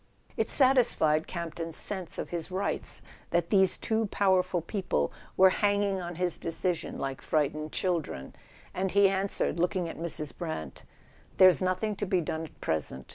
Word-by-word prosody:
It - - 0
satisfied 240 - +3
Campton's 165 -1 -5
sense 185 -4 -2
of - - -4
his 170 -1 -4
rights 190 +2 -3 0.3
that 170 0 0
these 190 -3 +4
two 220 -1 0
powerful 190 -2 +2
people 170 - -1 0.2
were 190 0 +7
hanging 200 -1 +1
on 175 0 -5
his 180 0 -1
decision 170 +1 -2
like 135 -1 -4
frightened 155 0 -1
children, 165 - -2 0.4
and 190 +1 -1
he 200 +1 +5
answered, 195 -2 -1
looking 175 0 +1
at 165 - -7
Mrs. 155 -3 -3
Brant: 120 - -6 0.5
''There's 185 0 +7
nothing 185 +3 0
to 205 - -2
be 185 -1 +2
done 160 0 -3
at - - -16
present. 75 -4 -2
180 Hz, 155 wpm, -29 LUFS, 160-195 Hz, 0.5 s, were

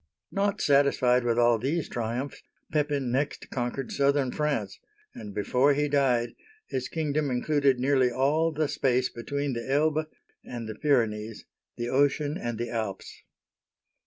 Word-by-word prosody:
Not 200 +1 0
satisfied 140 -3 +3
with 120 -1 +1
all 120 -1 +4
these 150 +7 -1
triumphs, 120 +4 -4 0.3
Pepin 145 -4 0
next 140 +3 -2
con 120 -1 -1
quered 135 0 -5
southern 140 -2 +2
France, 145 -10 -2 0.3
and 105 - -8
before 125 +7 +2
he 150 +1 +1
died 130 -5 +1 0.3
his 130 -1 -3
kingdom 150 -2 -1
included 135 +1 +2
nearly 130 -1 +3
all 145 +6 +1
the 155 0 0
space 130 -3 +1
between 140 +4 -3
the 115 +2 -4
Elbe 155 +2 +2 0.4
and 120 -2 -6
the 110 - -4
Pyrenees, 110 -5 0 0.3
the 120 0 -3
ocean 145 +2 +2
and 120 -5 -4
the 120 0 -4
Alps. 110 -5 -4
135 Hz, 145 wpm, -27 LUFS, 120-145 Hz, 0.4 s, all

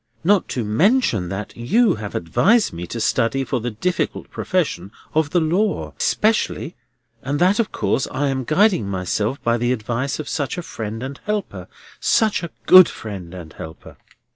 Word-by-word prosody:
Not 195 +1 +3
to 125 - -2
mention 115 - +2
that 100 +2 -5
you 210 - +2
have 105 -1 -7
advised 205 - +2
me 85 +1 -6
to 115 - -5
study 115 +4 +1
for 130 -1 -2
the 120 +2 -3
difficult 175 +12 -2
profession 145 - -2 0.2
of 155 -1 +2
the 175 - +2
law, 180 +6 0
specially, 215 -5 0 0.5
and 140 +2 -2
that 185 +6 +3
of 230 - 0
course 105 +6 0
I 145 -1 -1
am 130 -1 -1
guiding 165 - +2
myself 100 +6 -1
by 115 0 +2
the 120 +1 0
advice 125 +3 -2
of 155 - -6
such 145 +1 -2
a 175 - -4
friend 110 -4 -6
and 135 +1 -6
helper. 210 -1 -3 0.3
Such 220 -2 +2
a 170 - -5 0.2
good 185 -1 +9
friend 95 -6 -8
and 85 -4 -9
helper!" 80 0 -10
135 Hz, 170 wpm, -21 LUFS, -, 0.5 s, good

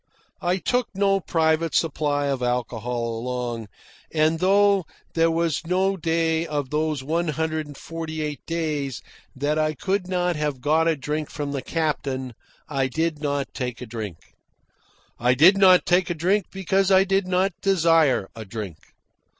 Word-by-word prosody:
I 175 +1 +1
took 245 +6 0
no 195 0 +2
private 160 -2 +1
supply 145 -2 +1
of 135 -2 -1
alcohol 120 -1 -2
along, 120 -2 -4 0.4
and, 160 +1 +2
though 200 0 +4 0.3
there 165 0 +3
was 165 -1 -1
no 190 +2 +2
day 165 -1 0
of 145 -3 -3
those 150 -2 -1
one 165 +4 -1
hundred 155 0 -2
and 145 -1 -11
forty 160 -1 -5
eight 150 -1 -5
days 150 -6 -2 0.3
that 145 +3 0
I 155 0 +1
could 190 +3 -1
not 180 -1 0
have 150 -3 -2
got 155 +4 +2
a 165 - +3
drink 150 +2 -3
from 145 -1 -4
the 140 -2 -3
captain, 135 -4 -2 0.3
I 135 -3 0
did 160 +2 -2
not 145 -2 -2
take 125 -3 -4
a 125 - -6
drink. 110 -7 -6 1.0
I 125 +1 +3
did 170 +9 +7
not 185 -2 +6
take 180 +1 +2
a 175 - -1
drink 190 +6 +1
because 195 0 +1
I 190 0 +6
did 195 0 +1
not 185 +1 +1
desire 165 - +3
a 110 - -7
drink. 100 -5 -6
155 Hz, 160 wpm, -24 LUFS, 135-175 Hz, 1.0 s, did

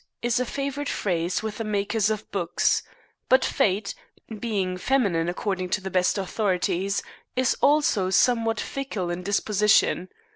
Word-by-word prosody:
is 240 +1 +1
a 250 - -1
favorite 280 +2 -3
phrase 175 0 -1
with 220 +1 -4
the - - -1
makers 210 0 0
of 215 -1 -4
books; 175 -4 +1 0.5
but 260 +1 +5
Fate, 200 0 0 0.5
being 195 -6 -1
feminine 180 -6 +1
according 185 0 -2
to 200 - 0
the 190 0 -6
best 180 +2 +2
authorities, 195 -1 -1 0.3
is 255 -1 +2
also 285 - +3
somewhat 230 +1 +2
fickle 215 -10 -3
in 175 +1 -4
disposition. 200 -1 +2
205 Hz, 140 wpm, -25 LUFS, 185-235 Hz, 0.5 s, but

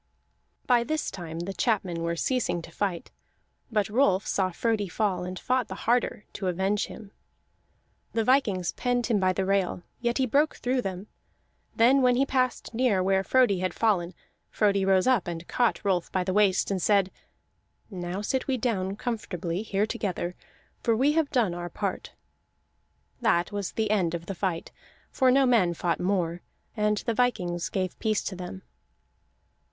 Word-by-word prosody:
By 240 -1 +4
this 310 +4 -2
time 170 -3 -6
the 190 +3 -4
chapmen 190 -5 0
were 170 0 -1
ceasing 175 -5 -1
to 165 - -11
fight; 180 -1 -3 0.6
but 210 -3 +1
Rolf 210 -4 +2
saw 190 -2 +1
Frodi 215 +2 0
fall, 190 -1 -1
and 185 +1 -5
fought 255 +3 0
the 190 - -6
harder, 240 -2 +1
to 190 - -4
avenge 190 +3 0
him. 205 -3 -11 1.0
The 225 - +1
vikings 215 -8 +2
penned 245 -1 0
him 225 -4 +1
by 185 -1 +3
the 190 +1 -1
rail, 190 -2 0 0.2
yet 240 0 0
he 265 - +2
broke 285 +5 +2
through 255 +1 0
them; 190 -2 -5 0.7
then 255 +4 +5
when 250 -1 +4
he 270 +2 +3
passed 255 -3 -1
near 225 -6 +2
where 190 0 +2
Frodi 245 -5 +3
had 185 0 -2
fallen, 185 -6 +1 0.3
Frodi 200 -2 +2
rose 190 -1 +3
up 255 -8 +2
and 170 -1 -5
caught 240 -4 0
Rolf 180 -3 0
by 185 - 0
the 185 +1 -2
waist, 200 -1 +3
and 190 -2 -1
said: 200 -2 +3 0.8
"Now 180 +1 -4
sit 260 +5 -1
we 265 -2 +1
down 200 -6 -1
comfortably 185 -6 -3
here 205 -1 0
together, 195 -6 -3 0.5
for 230 -2 +2
we 270 +6 +3
have 310 -2 +1
done 235 -10 +1
our 175 0 -5
part." 195 +1 -4 1.1
That 175 -6 +2
was 205 -2 -3
the 220 -2 0
end 180 -5 +1
of 170 0 -6
the 195 - -4
fight, 180 -3 -3 0.4
for 260 - +3
no 270 +1 +5
men 205 -9 +3
fought 170 0 -1
more, 180 -2 0 0.3
and 210 -1 +1
the 230 - +1
vikings 185 -8 0
gave 185 -2 -3
peace 215 -2 0
to 190 - -4
them. 185 +1 -7
200 Hz, 170 wpm, -27 LUFS, 180-235 Hz, 1.1 s, then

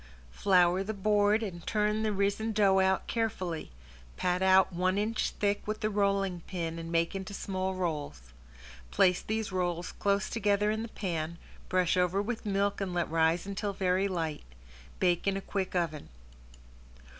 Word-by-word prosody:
Flour 180 - +3
the 215 +2 -4
board 210 +2 +2
and 175 -5 -6
turn 210 0 +1
the 220 -1 +1
risen 205 +3 0
dough 200 -2 +4
out 190 0 +2
carefully, 190 -8 -2 0.5
pat 180 0 0
out 190 0 +5
one 185 +2 +1
inch 215 +2 0
thick 205 0 -1
with 215 +1 -3
the 215 - 0
rolling 195 -3 +1
pin 165 -3 -4
and 165 0 -6
make 170 0 +1
into 195 +1 -5
small 190 -1 -2
rolls. 145 - -4 0.6
Place 180 - +3
these 220 -1 -2
rolls 175 -1 -2
close 200 -1 0
together 210 -1 +1
in 220 +1 -2
the 230 - -4
pan, 170 -5 -3 0.3
brush 185 -1 +2
over 180 +2 +2
with 220 +1 -3
milk 200 0 0
and 185 -2 -3
let 175 -2 -1
rise 165 +2 +2
until 200 +1 -3
very 190 0 +1
light. 165 -5 -3 0.6
Bake 175 0 +2
in 195 0 +2
a - - -1
quick 190 -1 -3
oven. 160 -4 -2
190 Hz, 165 wpm, -30 LUFS, 175-205 Hz, 0.6 s, out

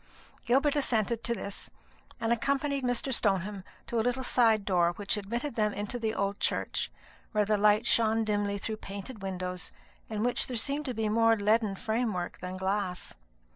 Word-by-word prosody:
Gilbert 275 +4 +3
assented 235 -5 +1
to 235 - 0
this, 200 -2 -6 0.5
and 230 +1 +2
accompanied 280 +3 0
Mr. 245 +2 0
Stoneham 195 -3 +1 0.2
to 235 - -1
a - - +4
little 245 +3 0
side 225 -5 +3
door 175 -3 +3
which 205 +3 0
admitted 235 +7 -3
them 210 -2 +1
into 210 +4 -3
the 220 -1 0
old 200 +1 -1
church, - - -1 0.4
where 210 -1 +3
the 210 +1 +2
light 210 +2 +4
shone 225 -1 +3
dimly 205 -1 0
through 215 +2 -3
painted 200 +3 -8
windows, 185 -1 -4 0.4
in 215 -1 -2
which 245 0 +1
there 250 - -3
seemed 280 +3 -1 0.2
more 225 +1 +5
leaden 210 0 +2
framework 220 -4 -2
than 180 +1 -5
glass. 190 -1 -2
215 Hz, 165 wpm, -30 LUFS, 200-240 Hz, 0.5 s, more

